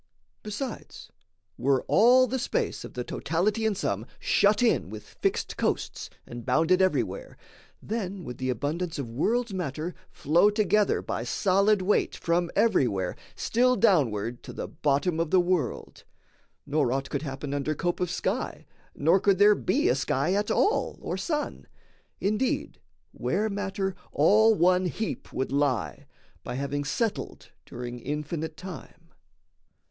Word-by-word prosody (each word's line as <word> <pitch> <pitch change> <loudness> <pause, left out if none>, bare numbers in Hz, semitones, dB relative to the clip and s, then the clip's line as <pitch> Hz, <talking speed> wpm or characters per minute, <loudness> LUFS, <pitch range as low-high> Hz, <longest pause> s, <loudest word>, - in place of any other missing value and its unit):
Besides, 215 +4 -6 0.5
were 135 -1 +2
all 250 +4 +6
the 260 +2 -2
space - - -2
Of - - -10
the 125 - -2
totality 200 - 0
and 210 -3 -1
sum 110 - -2
shut 205 +3 +3
in 225 - +2
With 110 0 -8
fixed - - -2
coasts, - - -2 0.2
and 120 0 -8
bounded 165 +9 +3
everywhere, 345 - -1 0.5
Then 200 -4 -4
would 125 -4 -8
the 130 0 -2
abundance 155 +7 -2
of 140 -4 -3
world's 225 - 0
matter 170 -1 -3 0.2
flow 170 +7 +3
Together 210 -1 +2
by 115 - -3
solid 195 - +2
weight 205 +3 +1
from 170 +1 0
everywhere 120 - +2 0.2
Still 250 +2 +2
downward 125 - +2
to - - -9
the - - -5
bottom 150 +4 0
of 165 -1 0
the 185 - +4
world, 175 -8 -1 0.6
Nor 140 -4 +1
aught 135 +1 -2
could 140 - -1
happen 140 -1 -5
under 145 +2 -1
cope 175 +4 -1
of 180 - 0
sky, - - -3 0.3
Nor 165 +6 +3
could 195 0 +3
there 205 +2 +7
be 190 - +1
a 125 - +4
sky 140 +5 0
at 205 +1 0
all 425 - +1
or - - -3
sun 300 -3 -3 0.5
Indeed, 215 +6 -1 0.3
where 215 +1 -1
matter 195 -1 -2 0.2
all 215 +8 +5
one 180 0 +3
heap 220 +4 -4
would 130 0 -2
lie, 130 - -1 0.4
By - - -5
having 140 +2 -2
settled 220 - -3 0.2
during 120 0 -6
infinite 150 +4 -4
time. 170 -2 -10
175 Hz, 145 wpm, -27 LUFS, 140-205 Hz, 0.6 s, there